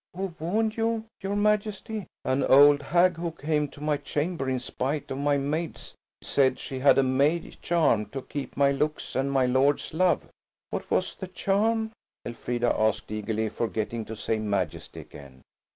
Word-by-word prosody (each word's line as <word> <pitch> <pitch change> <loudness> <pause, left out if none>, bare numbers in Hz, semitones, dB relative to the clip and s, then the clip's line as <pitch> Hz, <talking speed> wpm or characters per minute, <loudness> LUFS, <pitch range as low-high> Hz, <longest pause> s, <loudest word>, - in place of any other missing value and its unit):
"Who 190 -2 -3
warned 215 +7 0
you, 225 0 0 0.2
your 195 +1 -2
Majesty?" 210 0 0 0.2
"An 130 +1 +1
old 145 +1 +7
hag 175 +4 +3
who 170 0 -2
came 150 -2 -1
to 145 - -15
my 150 -1 +1
chamber 145 0 -2
in 130 -1 0
spite 135 +4 -3
of 135 - -3
my 145 0 +2
maids, 150 +4 -3 0.3
said 130 -2 +2
she 130 - -6
had 140 +2 +5
a 135 - +5
May 140 +6 +1
charm 155 -11 +2
to 135 +5 -6
keep 145 -3 -6
my 140 0 +4
looks 150 +2 -2
and 135 +1 0
my 135 -2 +3
lord's 135 +4 +2
love." 180 +2 +2 0.4
"What - - -4
was - - +1
the 190 - -7
charm?" 220 +4 0 0.3
Elfrida 120 +1 -1
asked 110 -1 0
eagerly, 110 +1 -2
forgetting 115 0 -3
to 110 - -7
say 110 +1 -1
"Majesty" 105 -2 -3
again. 65 -2 -14
145 Hz, 170 wpm, -27 LUFS, 130-175 Hz, 0.4 s, old